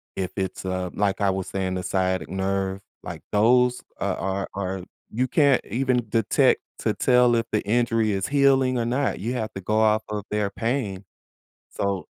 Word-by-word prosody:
if 95 -1 -3
it's, 95 -1 -3
uh, 95 -1 -2
like 100 0 0
I 100 - +3
was 95 -1 -3
saying, 95 -1 -2
the 90 - -3
sciatic 95 -1 -1
nerve, 95 0 -2 0.2
like - - -7
those 125 +4 +3 0.2
a - - -1
are 95 0 -2
are 95 -1 -3 0.3
you 125 +4 0
can't 140 -2 +3
even 125 0 0
detect 115 +1 +3 0.2
to - - 0
tell 125 -1 +4
if 115 0 +1
the 105 - +1
injury 115 -1 +2
is 95 -1 -1
healing 135 -2 +3
or 115 - 0
not, 130 +4 0
you 115 +6 -2
have 110 -4 -3
to 95 - -5
go 105 +4 0
off 110 0 +3
of 105 -1 -3
their 105 -1 0
pain. 115 -5 -2 0.7
So, 100 -4 -2
105 Hz, 180 wpm, -24 LUFS, 95-120 Hz, 0.7 s, tell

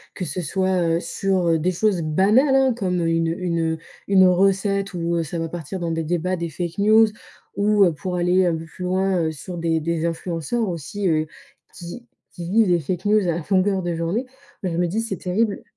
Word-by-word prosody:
que 185 - -4
ce 170 +4 -4
soit, 185 +3 0 0.2
heu, - - -2
sur, 190 0 -1
heu, 165 -1 +3
des 180 +4 +1
choses 190 0 +1
banales, 205 - +3
hein, 265 -1 +4
comme 180 -6 -1
une, 165 0 +1
heu, 165 - -3
une, 170 -2 -1
heu, - - -4 0.3
une 190 -1 +6
recette 195 +2 +1
où 170 0 0
ça 165 +2 -5
va 165 0 -3
partir 175 +2 -6
dans 170 -1 -2
des 165 0 -1
débats, 175 +3 -1
des 170 -1 -3
fake 170 +3 -5
news, 220 +2 +6 0.5
ou, 205 -3 +4
pour 180 +4 -4
aller 180 +1 +2
un 170 - +1
peu 160 0 -6
plus 180 +3 -8
loin, 190 0 +1
heu, 160 - 0
sur 165 +4 -8
des 165 -1 +1
des 165 +1 -1
influenceurs 170 +7 -2
aussi, 185 +4 -3
heu, 155 -2 +1 0.5
qui 180 +8 -9 0.2
qui 170 -1 -7
vivent 220 0 +4
des 175 -1 +3
fake 175 +5 -4
news, 210 -2 +3
à 170 +1 -1
longueur 190 0 +2
de 175 -1 -2
journée. 170 +10 -1 0.4
Bah, 185 - 0
je 165 - -3
me 175 - +2
dis, 210 +7 -1
c'est 225 -5 -4
terrible. 200 +5 -1
180 Hz, 215 wpm, -22 LUFS, 165-195 Hz, 0.5 s, une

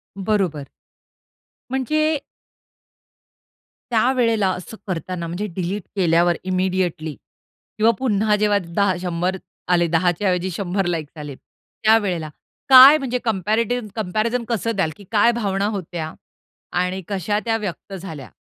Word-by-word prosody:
बरोबर. 190 -8 -1 1.0
म्हणजे 305 +4 +1 1.7
त्यावेळेला 230 -3 +2
असं 185 +4 -7
करताना 175 -1 -4
म्हणजे 175 +5 -3
डिलीट 190 +2 -3
केल्यावर 175 -2 +3
इमिडिएटली 185 -4 -1 0.6
किंवा 220 +2 +5
पुन्हा 215 -4 +2
जेव्हा 210 0 +2
10 190 +3 +1
100 180 +1 -1 0.3
आले, 175 -1 +3
10च्या 175 +3 +1
ऐवजी 180 0 0
100 190 +1 -2
लाइक्स 165 -3 -3
आले 150 -2 -7
त्यावेळेला, 200 -3 -1 0.4
काय 265 +3 +10
म्हणजे 260 -4 -2
कम्पॅरेटिव्ह, 220 +3 0
कम्पॅरिझन 220 +4 -1
कसं 230 0 -1
द्याल 190 -5 +1
कि 205 - -13
काय 225 +2 +4
भावना 200 -4 -1
होत्या? 165 -3 -5 0.6
आणि 180 +1 -1
कशा 205 +1 -1
त्या 225 -1 +1
व्यक्त 200 -2 -6
झाल्या? 160 - -8
195 Hz, 115 wpm, -21 LUFS, 175-220 Hz, 1.7 s, काय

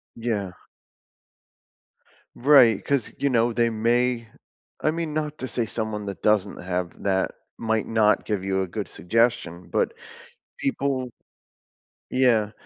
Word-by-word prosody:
Yeah. 110 -5 -2 1.8
Right, 125 -6 +6
'cause, 140 -5 0
you 140 - +1
know, 120 -2 +2
they 115 0 +2
may 115 +1 +1 0.6
I 155 - +4
mean, 165 -1 -3
not 150 -1 -2
to 130 - -3
say 120 -2 -1
someone 110 -2 -3
that 100 - -6
doesn't 105 -2 +2
have 90 -1 -4
that 95 -1 +1 0.3
might 110 -1 -1
not 110 -2 +3
give 105 -3 -2
you 95 0 0
a - - -4
good - - -4
suggestion, 110 -5 0
but - - 0 0.6
people 135 -2 -1 1.0
Yeah, 120 -5 +3
115 Hz, 130 wpm, -25 LUFS, 105-125 Hz, 1.8 s, Right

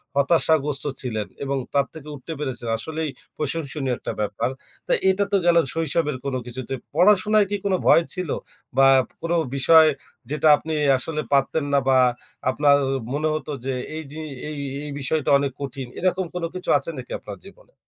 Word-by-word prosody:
হতাশাগ্রস্ত 145 -1 +2 0.2
ছিলেন 110 -5 -3 0.2
এবং 140 0 -1 0.2
তার 140 -1 +3
থেকে 155 -2 -10
উঠতে 145 +4 -7
পেরেছেন। 130 -5 -4
আসলেই 160 +5 -3 0.3
প্রশংসনীয় 145 -3 -2
একটা - - -5
ব্যাপার। 105 +4 -1 0.4
তো - - -2 0.2
এটা 195 +2 +2
তো 200 - +4
গেল 170 -1 +5 0.2
শৈশবের 160 -2 0
কোনো 135 -2 -1
কিছুতে। 125 +1 -6 0.2
পড়াশোনায় 205 +3 +4
কি 205 - +1
কোনো 190 -2 +2
ভয় 165 - +6
ছিল, 180 -4 -4 0.5
বা 135 - +7 0.3
কোনো 170 +1 0 0.2
বিষয় 160 +4 +7 0.4
যেটা 150 +1 +1
আপনি 160 +1 -5 0.2
আসলে 155 +4 -2
পারতেন 140 +2 +2
না 140 - +5
বা 130 -1 +5 0.5
আপনার 140 +1 +4 0.4
মনে 155 +2 0
হত 155 - -5 0.2
যে 135 - -1 0.2
এই 160 - -4
যে 155 +1 -7 0.3
এই 150 - -6 0.3
এই - - -6
বিষয়টা 145 +1 0
অনেক 140 -1 -1
কঠিন? 135 -2 -5
এরকম 185 +1 +1
কোনো 170 -2 -1
কিছু 185 +1 -6
আছে - - -5
নাকি - - -8
আপনার - - -9
জীবনে? - - -17
150 Hz, 170 wpm, -23 LUFS, 135-165 Hz, 0.5 s, বা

